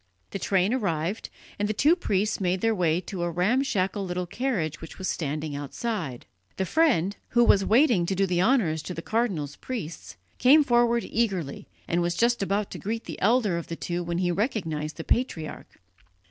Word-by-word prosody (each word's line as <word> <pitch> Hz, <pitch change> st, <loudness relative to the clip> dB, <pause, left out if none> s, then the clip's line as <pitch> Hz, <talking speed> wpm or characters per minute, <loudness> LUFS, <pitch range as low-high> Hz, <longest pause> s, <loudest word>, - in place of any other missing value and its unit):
The 195 Hz, -, -4 dB
train 195 Hz, +3 st, +1 dB
arrived, 190 Hz, -4 st, -1 dB, 0.3 s
and 205 Hz, 0 st, 0 dB
the 215 Hz, -, -1 dB
two 300 Hz, +10 st, +4 dB
priests 210 Hz, -, -1 dB
made 180 Hz, 0 st, 0 dB
their 225 Hz, 0 st, +2 dB
way 175 Hz, -3 st, +1 dB
to 185 Hz, 0 st, -6 dB
a 175 Hz, -, 0 dB
ramshackle 195 Hz, +1 st, 0 dB
little 180 Hz, -1 st, -3 dB
carriage 175 Hz, -, -2 dB
which 165 Hz, -, -10 dB
was 190 Hz, -, -4 dB
standing 150 Hz, -1 st, -3 dB
outside. 145 Hz, -, -4 dB, 0.3 s
The 190 Hz, -, 0 dB
friend, 205 Hz, -, +2 dB
who 240 Hz, 0 st, +4 dB
was 200 Hz, -4 st, +5 dB
waiting 225 Hz, -, +4 dB
to 195 Hz, -, 0 dB
do 195 Hz, +1 st, +2 dB
the 175 Hz, -2 st, +1 dB
honours 185 Hz, -, +2 dB
to 180 Hz, -, -6 dB
the 165 Hz, -, -6 dB
cardinal's 185 Hz, -, -1 dB
priests, 200 Hz, -, -6 dB, 0.2 s
came 290 Hz, +5 st, +7 dB
forward 240 Hz, -2 st, +3 dB
eagerly, 190 Hz, -11 st, -2 dB, 0.2 s
and 175 Hz, 0 st, +1 dB
was 175 Hz, 0 st, 0 dB
just 240 Hz, +2 st, +2 dB
about 200 Hz, +1 st, -1 dB
to -, -, -6 dB
greet 225 Hz, +3 st, -3 dB
the -, -, -8 dB
elder 210 Hz, -4 st, +3 dB
of 170 Hz, -, -8 dB
the 165 Hz, -, -4 dB
two 175 Hz, +1 st, -3 dB
when 170 Hz, 0 st, -3 dB
he 180 Hz, -1 st, +1 dB
recognized 165 Hz, -, -2 dB
the 160 Hz, -, -5 dB
patriarch. 165 Hz, -, -2 dB
190 Hz, 190 wpm, -26 LUFS, 170-230 Hz, 0.3 s, came